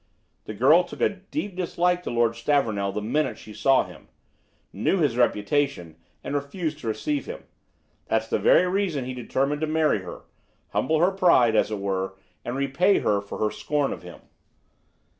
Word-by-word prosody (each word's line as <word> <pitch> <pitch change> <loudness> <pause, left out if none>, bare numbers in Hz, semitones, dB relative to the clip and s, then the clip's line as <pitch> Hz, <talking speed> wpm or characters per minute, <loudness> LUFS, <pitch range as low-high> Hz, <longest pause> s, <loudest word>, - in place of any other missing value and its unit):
The 110 - -7
girl 150 - +5
took 175 - -11
a - - +3
deep 200 +1 -6
dislike 180 0 0
to - - -5
Lord 115 -1 +2
Stavornell 115 -6 0
the 105 +1 -4
minute 145 +8 0
she 110 - -12
saw 135 +4 +3
him; - - -14 0.7
knew 105 - +1
his 150 -9 +1
reputation, 120 - 0 0.3
and - - -5
refused 150 +2 -3
to 120 - -7
receive 285 - -2
him. 470 - -7 0.6
That's - - 0
the - - 0
very 475 - +5
reason 180 -8 -1
he 130 - -4
determined 135 +4 -1
to 155 - 0
marry 155 -6 +2
her, 90 -2 -9 0.5
humble 155 +5 +1
her 180 +3 +4
pride, 170 -12 +4
as 105 - +3
it 105 - -3
were, 95 -1 -2 0.3
and 120 - -4
repay 140 +9 +2
her 100 -1 +1
for 100 - -8
her 105 -1 0
scorn 145 -2 -1
of - - -9
him. 90 -1 -12
140 Hz, 180 wpm, -25 LUFS, 110-175 Hz, 0.7 s, girl